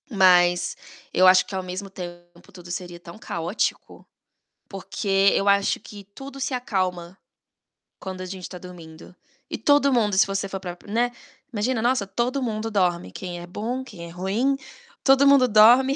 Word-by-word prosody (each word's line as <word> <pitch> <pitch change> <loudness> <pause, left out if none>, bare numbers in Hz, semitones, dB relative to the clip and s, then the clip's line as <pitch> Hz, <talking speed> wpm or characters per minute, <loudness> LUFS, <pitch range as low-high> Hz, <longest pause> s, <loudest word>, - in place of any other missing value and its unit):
Mas 180 -5 +4 0.4
eu 185 +1 +5
acho 185 0 +6
que - - -11
ao 190 - -2
mesmo 185 +2 -6
tempo 175 0 -11
tudo 175 -1 -11
seria 175 -1 -6
tão 170 +3 -12
caótico, 170 +2 -3 0.6
porque 195 0 +1
eu 195 - 0
acho 200 0 +3
que 205 -1 -12
tudo 275 0 -9
se 265 - -2
acalma 185 -7 -2 0.8
quando 185 -1 -7
a - - -5
gente 185 -1 -7
tá 180 - -8
dormindo. 175 -2 -12 0.3
E - - -4
todo 280 +3 +3
mundo, 215 -4 +2
se 195 - +5
você 195 0 -2
for 195 - -5
parar 180 -2 -6
para 200 - -14
né. 240 +2 +1 0.4
Imagina, 225 +2 -1
nossa, 240 -3 +1
todo 240 +7 -2
mundo 225 -1 -3
dorme, 180 - 0
quem 175 - -7
é 175 - -9
bom, 230 +8 -4
quem 205 -10 -10
é - - -10
ruim, 200 +10 -1 0.5
todo 270 0 +5
mundo 275 -2 +6
dorme 245 +5 +6
195 Hz, 175 wpm, -24 LUFS, 180-235 Hz, 0.8 s, acho